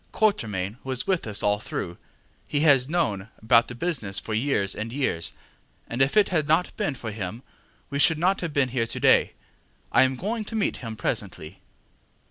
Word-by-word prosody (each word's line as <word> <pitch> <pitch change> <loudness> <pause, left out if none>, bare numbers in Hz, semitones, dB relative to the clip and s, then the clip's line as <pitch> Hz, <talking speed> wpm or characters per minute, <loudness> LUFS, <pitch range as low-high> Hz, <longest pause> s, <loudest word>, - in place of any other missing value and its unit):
Quatermain 110 - 0
was 130 -2 -2
with 185 -10 0
us 105 -1 -1
all 105 0 +2
through; 85 -4 -5 0.5
he 145 - 0
has 140 -4 +5
known 110 - -1
about 115 +2 +4
the 125 - -7
business 120 - -2
for 110 - -3
years 110 -5 +1
and 110 +2 -5
years, 125 -11 -1 0.5
and 120 +3 -2
if 135 +9 +3
it 210 - +5
had 155 -6 0
not 160 +4 +2
been 195 -10 -1
for 115 -3 -6
him 105 +3 -6 0.5
we 140 - -2
should 165 +1 +5
not 185 +4 +1
have 170 -3 -3
been 140 -3 +1
here 120 -2 -1
to - - -3
day. - - +4 0.6
I - - +5
am 130 0 +3
going 215 - -3
to 225 - -7
meet 215 - 0
him 115 -3 -6
presently. 95 -5 -4
130 Hz, 190 wpm, -25 LUFS, 110-160 Hz, 0.6 s, has